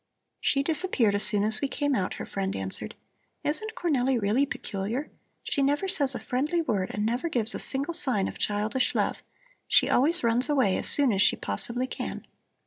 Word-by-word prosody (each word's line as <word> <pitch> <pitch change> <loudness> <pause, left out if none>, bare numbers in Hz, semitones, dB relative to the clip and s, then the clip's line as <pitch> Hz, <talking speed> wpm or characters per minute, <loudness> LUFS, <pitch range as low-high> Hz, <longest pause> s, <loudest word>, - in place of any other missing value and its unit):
"She 275 -1 +1
disappeared 305 - +1
as 205 - +1
soon 205 0 +3
as 215 +1 +1
we 280 - 0
came 285 +1 -1
out," 185 -7 -1
her - - -6
friend 195 -1 -3
answered. 95 0 -1 0.5
"Isn't 435 +9 -2
Cornelli 265 -6 +1
really 225 +7 +1
peculiar? 225 +5 -4 0.3
She 285 - -1
never 290 +7 +1
says 285 -9 +2
a - - -3
friendly 295 +7 -1
word 210 - -1
and 210 0 -2
never 245 +9 -1
gives 235 -5 +1
a - - -4
single 280 +5 -2
sign 255 -11 +4
of - - -8
childish 210 +5 0
love. - - -1 0.5
She - - +4
always 310 +6 +3
runs 235 +4 +1
away 260 -10 +2
as - - 0
soon 275 -6 +3
as 195 - +1
she - - +4
possibly 235 - -2
can." - - -6
255 Hz, 190 wpm, -27 LUFS, 210-290 Hz, 0.5 s, sign